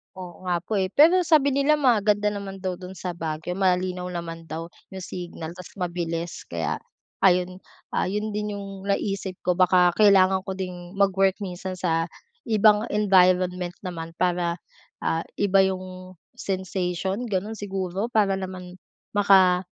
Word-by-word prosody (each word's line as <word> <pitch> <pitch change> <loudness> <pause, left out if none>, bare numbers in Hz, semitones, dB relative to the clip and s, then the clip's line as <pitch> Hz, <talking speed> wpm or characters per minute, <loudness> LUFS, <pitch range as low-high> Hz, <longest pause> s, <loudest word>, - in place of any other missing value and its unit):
Oo 185 0 -10
nga 175 -1 0
po, 205 +2 -1
eh. 190 - +1
Pero 335 +5 +6
sabi 300 -4 +4
nila 280 +3 +3
maganda 210 -7 +3
naman 195 -2 -6
daw 185 -1 -2
do'n 185 0 -9
sa 180 0 -4
Baguio 165 +1 -4
malinaw 180 -1 0
naman 165 -2 -6
daw 165 +2 -6 0.2
'yong 190 -1 -6
signal 175 -3 -7
tas 180 0 -11
mabilis. 170 -2 -4
Kaya 80 -3 -2 0.4
ayun, 180 0 +2 0.3
ah, - - 0
'yon 210 +3 -2
din 210 0 -3
yung 195 -1 -8
naisip 195 -1 -1
ko 180 -1 +1
baka 180 -1 +5
kailangan 190 -2 +5
ko 190 - -3
ding 180 -1 -7
mag-work 195 -1 +3
minsan 185 0 -5
sa 165 -2 0 0.4
ibang 215 0 +4
environment 180 -3 +3
naman 165 -3 -6
para, 175 -1 0 0.5
ah, 165 +1 0
iba 200 -1 +3
yung 185 0 -6 0.2
sensation 190 +2 -2
gano'n 210 +2 -2
siguro. 195 0 -3
Para 205 -5 +2
naman 185 -1 -8 0.3
maka 190 -3 +4
185 Hz, 145 wpm, -25 LUFS, 180-200 Hz, 0.5 s, Pero